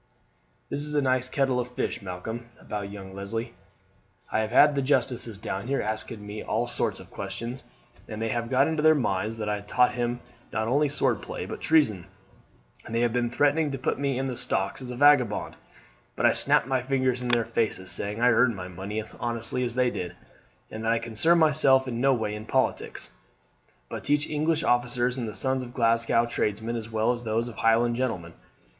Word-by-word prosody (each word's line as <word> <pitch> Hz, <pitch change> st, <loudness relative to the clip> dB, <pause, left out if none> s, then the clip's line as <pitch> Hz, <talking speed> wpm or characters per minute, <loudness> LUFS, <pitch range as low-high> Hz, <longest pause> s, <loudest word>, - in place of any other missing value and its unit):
"This -, -, -1 dB
is 150 Hz, +1 st, -1 dB
a 145 Hz, -, +3 dB
nice 130 Hz, -1 st, +1 dB
kettle 135 Hz, -2 st, +1 dB
of 125 Hz, -, -2 dB
fish, -, -, -3 dB
Malcolm, 105 Hz, +5 st, -6 dB
about 100 Hz, -1 st, -5 dB
young 95 Hz, -2 st, -9 dB
Leslie. 100 Hz, +4 st, -4 dB, 0.8 s
I -, -, +1 dB
have 110 Hz, 0 st, 0 dB
had 145 Hz, +5 st, +6 dB
the 140 Hz, -, 0 dB
justices 125 Hz, -5 st, 0 dB
down 100 Hz, +2 st, -4 dB
here, 140 Hz, +1 st, 0 dB
asking 110 Hz, 0 st, -3 dB
me 105 Hz, +1 st, -6 dB
all 115 Hz, +2 st, -1 dB
sorts 120 Hz, -, -1 dB
of -, -, -13 dB
questions, 120 Hz, +3 st, -6 dB, 0.4 s
and 110 Hz, -, -6 dB
they 115 Hz, 0 st, -1 dB
have 115 Hz, +1 st, -2 dB
got 130 Hz, +2 st, +4 dB
into 160 Hz, -1 st, 0 dB
their 155 Hz, 0 st, +6 dB
minds 110 Hz, -4 st, -1 dB
that 105 Hz, -1 st, -3 dB
I 105 Hz, -1 st, -1 dB
taught 125 Hz, +5 st, +2 dB
him 120 Hz, 0 st, -1 dB, 0.3 s
not 110 Hz, -, -1 dB
only 145 Hz, +4 st, +2 dB
swordplay 145 Hz, -, -1 dB
but -, -, -7 dB
treason, 110 Hz, -, +3 dB, 0.8 s
and 115 Hz, -, -6 dB
they 115 Hz, -, +2 dB
have 120 Hz, -1 st, +2 dB
been 120 Hz, -1 st, +1 dB
threatening 145 Hz, +5 st, +2 dB
to 135 Hz, -, -3 dB
put 130 Hz, -, -1 dB
me 140 Hz, -2 st, 0 dB
in 135 Hz, -, -1 dB
the 130 Hz, -2 st, -3 dB
stocks 95 Hz, +1 st, -2 dB
as 130 Hz, -, -7 dB
a 125 Hz, -, -5 dB
vagabond; 130 Hz, -5 st, +4 dB, 0.6 s
but -, -, 0 dB
I -, -, +7 dB
snapped -, -, +2 dB
my 130 Hz, -1 st, 0 dB
fingers 130 Hz, -1 st, 0 dB
in 125 Hz, -, -3 dB
their 120 Hz, -2 st, +3 dB
faces, 105 Hz, -5 st, -1 dB
saying 105 Hz, +2 st, -2 dB
I 125 Hz, +1 st, +5 dB
earned 115 Hz, 0 st, +4 dB
my 90 Hz, -2 st, -6 dB
money 95 Hz, +4 st, -5 dB
as 110 Hz, -, -7 dB
honestly 120 Hz, +1 st, -2 dB
as 120 Hz, -1 st, -2 dB
they 125 Hz, -1 st, +2 dB
did, 90 Hz, -1 st, -5 dB, 0.6 s
and 110 Hz, 0 st, -6 dB
that 115 Hz, 0 st, +2 dB
I -, -, +2 dB
concern 115 Hz, +9 st, +2 dB
myself 140 Hz, -4 st, +4 dB
in 120 Hz, -1 st, -3 dB
no 135 Hz, +1 st, +4 dB
way 110 Hz, -5 st, 0 dB
in 105 Hz, +1 st, -7 dB
politics, -, -, -1 dB, 0.8 s
but -, -, -6 dB
teach 145 Hz, 0 st, +1 dB
English 155 Hz, +1 st, 0 dB
officers 120 Hz, 0 st, +1 dB
and 115 Hz, -3 st, -3 dB
the 105 Hz, -, -8 dB
sons 130 Hz, +2 st, 0 dB
of 120 Hz, -1 st, -9 dB
Glasgow 115 Hz, -1 st, +3 dB
tradesmen 110 Hz, 0 st, -1 dB
as 115 Hz, -1 st, -5 dB
well 110 Hz, +1 st, +2 dB
as 120 Hz, -1 st, -3 dB
those 115 Hz, +1 st, 0 dB
of 120 Hz, -, -9 dB
Highland 115 Hz, +1 st, +3 dB
gentlemen. 100 Hz, -10 st, -2 dB
120 Hz, 205 wpm, -27 LUFS, 110-130 Hz, 0.8 s, I